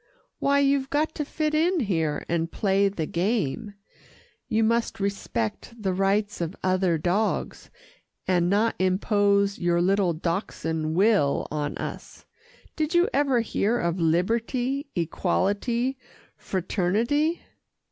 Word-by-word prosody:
"Why, 280 Hz, 0 st, +2 dB
you've 275 Hz, -1 st, +2 dB
got 310 Hz, +2 st, 0 dB
to 300 Hz, -, -3 dB
fit 305 Hz, +1 st, -2 dB
in 335 Hz, +2 st, +2 dB
here, 160 Hz, -, -1 dB
and 165 Hz, -1 st, -1 dB
play 200 Hz, 0 st, +2 dB
the 170 Hz, -5 st, -3 dB
game. 200 Hz, -, -1 dB, 0.7 s
You 225 Hz, +1 st, +1 dB
must 230 Hz, 0 st, 0 dB
respect 195 Hz, -, -3 dB
the 195 Hz, -3 st, -1 dB
rights 195 Hz, +1 st, 0 dB
of 170 Hz, +3 st, -3 dB
other 185 Hz, -2 st, +2 dB
dogs, 180 Hz, +7 st, -1 dB, 0.6 s
and 175 Hz, -2 st, +2 dB
not 215 Hz, +4 st, +2 dB
impose 200 Hz, +1 st, +2 dB
your 175 Hz, 0 st, +1 dB
little 185 Hz, 0 st, +2 dB
Dachshund 160 Hz, -2 st, -2 dB
will 195 Hz, -7 st, +3 dB
on 150 Hz, -1 st, -2 dB
us. -, -, -7 dB, 0.5 s
Did 310 Hz, +2 st, -1 dB
you 350 Hz, +5 st, +4 dB
ever 275 Hz, -4 st, +2 dB
hear 225 Hz, +1 st, 0 dB
of 170 Hz, -3 st, -1 dB
liberty, 230 Hz, -, 0 dB
equality, 205 Hz, -, 0 dB, 0.4 s
fraternity?" 220 Hz, -, 0 dB
200 Hz, 120 wpm, -25 LUFS, 175-240 Hz, 0.7 s, you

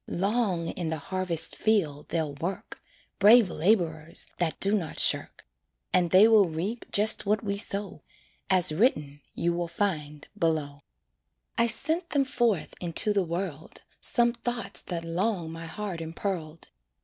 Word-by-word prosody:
Long 190 Hz, -3 st, -1 dB
in 170 Hz, -3 st, -4 dB
the 160 Hz, -, -2 dB
harvest 175 Hz, 0 st, -2 dB
field 165 Hz, -10 st, 0 dB
they'll 160 Hz, -4 st, -2 dB
work 170 Hz, +7 st, -6 dB, 0.4 s
Brave 215 Hz, 0 st, +6 dB
laborers 165 Hz, -3 st, 0 dB
that 170 Hz, -3 st, -1 dB
do 200 Hz, +1 st, +3 dB
not 170 Hz, -7 st, -4 dB
shirk, -, -, +2 dB, 0.5 s
And 175 Hz, -2 st, +3 dB
they 190 Hz, +5 st, +7 dB
will 220 Hz, -3 st, +5 dB
reap 190 Hz, +9 st, -5 dB
just 210 Hz, 0 st, +2 dB
what 210 Hz, +1 st, +1 dB
we 200 Hz, -1 st, -2 dB
sow, 200 Hz, -2 st, -2 dB, 0.5 s
As 185 Hz, -4 st, +5 dB
written 150 Hz, -, 0 dB
you 170 Hz, 0 st, 0 dB
will 175 Hz, 0 st, -2 dB
find 155 Hz, -5 st, -3 dB
below. 155 Hz, -6 st, -1 dB, 0.7 s
I 235 Hz, -, +3 dB
sent 320 Hz, +9 st, 0 dB
them 280 Hz, -2 st, +1 dB
forth 240 Hz, -8 st, 0 dB
into 175 Hz, +4 st, +2 dB
the 200 Hz, -, +2 dB
world, 170 Hz, -3 st, -5 dB, 0.2 s
Some 235 Hz, -1 st, +3 dB
thoughts 240 Hz, 0 st, -2 dB
that 170 Hz, -2 st, -5 dB
long 175 Hz, 0 st, -2 dB
my 165 Hz, 0 st, -8 dB
heart 195 Hz, -2 st, -5 dB
impearled. 165 Hz, -1 st, -5 dB
180 Hz, 145 wpm, -27 LUFS, 165-210 Hz, 0.7 s, they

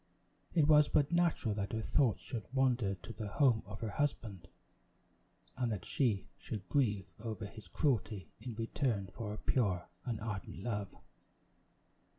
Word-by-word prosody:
It 155 Hz, -4 st, +5 dB
was 150 Hz, -1 st, +7 dB
but 145 Hz, +1 st, +3 dB
natural 170 Hz, -10 st, +2 dB
that 100 Hz, 0 st, -3 dB
her 110 Hz, -, 0 dB
thoughts 130 Hz, -3 st, +2 dB
should 115 Hz, -4 st, -5 dB
wander 125 Hz, -7 st, +2 dB
to 95 Hz, +5 st, -9 dB
the 110 Hz, -2 st, -5 dB
home 115 Hz, +1 st, +4 dB
of 105 Hz, +1 st, -8 dB
her 110 Hz, -2 st, -2 dB
husband, 110 Hz, -8 st, -2 dB, 1.1 s
and 125 Hz, -2 st, 0 dB
that 105 Hz, -, -3 dB
she 115 Hz, -8 st, +1 dB
should 100 Hz, -5 st, -5 dB
grieve 105 Hz, -9 st, +2 dB
over 110 Hz, -1 st, -4 dB
his 105 Hz, -2 st, -10 dB
cruelty 105 Hz, -, 0 dB
in 120 Hz, -3 st, -5 dB
return 115 Hz, -3 st, -1 dB
for 115 Hz, -2 st, -4 dB
her 105 Hz, -, -4 dB
pure 100 Hz, -10 st, +1 dB, 0.2 s
and 115 Hz, -3 st, -2 dB
ardent 100 Hz, -4 st, -5 dB
love. 105 Hz, -4 st, -1 dB
110 Hz, 155 wpm, -35 LUFS, 100-130 Hz, 1.1 s, was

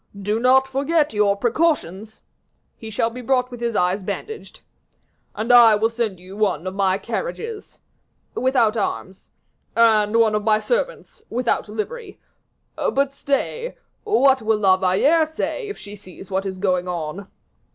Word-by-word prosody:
"Do 210 Hz, +3 st, -1 dB
not 260 Hz, +2 st, +4 dB
forget 285 Hz, +2 st, 0 dB
your 210 Hz, -1 st, +2 dB
precautions." 225 Hz, -, -1 dB, 0.5 s
"He 220 Hz, -, -9 dB
shall 225 Hz, +1 st, -1 dB
be 250 Hz, +2 st, -8 dB
brought 250 Hz, 0 st, 0 dB
with 245 Hz, -, -8 dB
his 235 Hz, -2 st, -2 dB
eyes 180 Hz, +2 st, +1 dB
bandaged." 205 Hz, -, -7 dB, 0.7 s
"And 225 Hz, +4 st, +1 dB
I 235 Hz, -3 st, +8 dB
will 220 Hz, +2 st, +1 dB
send 225 Hz, -5 st, -3 dB
you 185 Hz, +2 st, -12 dB
one 195 Hz, -6 st, 0 dB
of 185 Hz, -, -4 dB
my 195 Hz, -1 st, +1 dB
carriages." 455 Hz, -, -6 dB, 0.6 s
"Without 245 Hz, -4 st, +2 dB
arms." 195 Hz, -3 st, -4 dB, 0.5 s
"And 220 Hz, -2 st, +4 dB
one 220 Hz, -2 st, +4 dB
of 210 Hz, 0 st, 0 dB
my 215 Hz, 0 st, +3 dB
servants -, -, -3 dB
without 240 Hz, -2 st, -1 dB
livery. 390 Hz, -, -6 dB, 0.6 s
But 275 Hz, 0 st, 0 dB
stay, 300 Hz, -, -2 dB, 0.3 s
what 275 Hz, -12 st, +3 dB
will 220 Hz, 0 st, +1 dB
La 195 Hz, -3 st, +4 dB
Valliere 235 Hz, -, +2 dB
say 370 Hz, +8 st, -4 dB
if 410 Hz, -, -6 dB
she 205 Hz, 0 st, -10 dB
sees 190 Hz, -1 st, -14 dB
what 190 Hz, +1 st, -1 dB
is 190 Hz, -1 st, -5 dB
going 185 Hz, -2 st, 0 dB
on?" 175 Hz, +2 st, -5 dB
225 Hz, 150 wpm, -21 LUFS, 200-270 Hz, 0.7 s, I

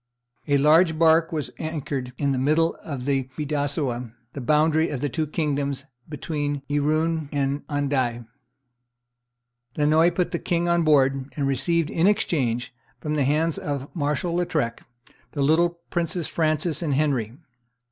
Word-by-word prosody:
A 145 Hz, -1 st, +3 dB
large 160 Hz, +3 st, +4 dB
bark 165 Hz, 0 st, +4 dB
was 150 Hz, -6 st, -3 dB
anchored 145 Hz, -5 st, -4 dB
in 140 Hz, -1 st, 0 dB
the 130 Hz, -, 0 dB
middle 155 Hz, +5 st, +2 dB
of 135 Hz, -5 st, -6 dB
the 135 Hz, -2 st, 0 dB
Bidassoa, 145 Hz, -5 st, -2 dB, 0.2 s
the 140 Hz, -, -6 dB
boundary 155 Hz, +4 st, +3 dB
of 145 Hz, -, -3 dB
the 145 Hz, +2 st, -1 dB
two 155 Hz, 0 st, -2 dB
kingdoms, 140 Hz, -3 st, -2 dB, 0.2 s
between 145 Hz, -1 st, -3 dB
Irun 155 Hz, +1 st, 0 dB
and 140 Hz, 0 st, -1 dB
Andaye. 135 Hz, -5 st, -1 dB, 1.5 s
Lannoy 155 Hz, +3 st, +4 dB
put 180 Hz, -1 st, 0 dB
the 170 Hz, -, -2 dB
king 175 Hz, 0 st, 0 dB
on 170 Hz, 0 st, +3 dB
board, 135 Hz, -3 st, +2 dB
and 140 Hz, -, 0 dB
received 145 Hz, +5 st, 0 dB
in 170 Hz, +3 st, +2 dB
exchange, 125 Hz, -, 0 dB, 0.3 s
from 150 Hz, +4 st, -3 dB
the 145 Hz, -3 st, +1 dB
hands 155 Hz, +3 st, +1 dB
of 140 Hz, +1 st, -5 dB
Marshal 150 Hz, +2 st, -1 dB
Lautrec, 155 Hz, -9 st, -1 dB, 0.5 s
the 145 Hz, -, 0 dB
little 170 Hz, +3 st, +2 dB
princes 170 Hz, -1 st, -1 dB
Francis 155 Hz, -1 st, 0 dB
and 150 Hz, -5 st, 0 dB
Henry. 130 Hz, -6 st, 0 dB
150 Hz, 145 wpm, -24 LUFS, 140-160 Hz, 1.5 s, large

